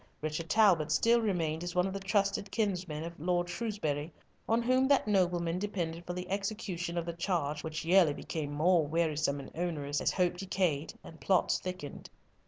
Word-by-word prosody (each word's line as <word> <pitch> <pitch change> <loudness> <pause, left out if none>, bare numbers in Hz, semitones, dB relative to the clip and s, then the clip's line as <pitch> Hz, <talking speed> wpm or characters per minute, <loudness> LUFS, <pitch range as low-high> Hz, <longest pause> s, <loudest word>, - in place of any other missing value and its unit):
Richard 155 +1 -3
Talbot 185 -8 +4
still 235 +1 +4
remained 165 -6 -1
as 175 0 -5
one 180 0 +3
of 190 - -3
the 195 - -3
trusted 195 0 0
kinsmen 180 -8 -2
of 170 -1 -8
Lord 175 +2 0
Shrewsbury, 170 -8 -3 0.4
on 230 +1 +3
whom 255 +2 +3
that 280 -5 +3
nobleman 175 -3 +1
depended 175 -4 -3
for 175 - -2
the 180 0 -5
execution 195 -3 -3
of 170 - -1
the 170 - -4
charge 165 -4 -1
which 160 0 -4
yearly 170 -4 +5
became 150 -3 -4
more 165 +3 +3
wearisome 155 -2 0
and 135 - -9
onerous, 150 -4 -2
as - - +2
hope 180 -1 +1
decayed 180 -5 -1
and 160 - -12
plots 190 -2 +2
thickened. 180 -5 -7
175 Hz, 180 wpm, -31 LUFS, 160-195 Hz, 0.4 s, yearly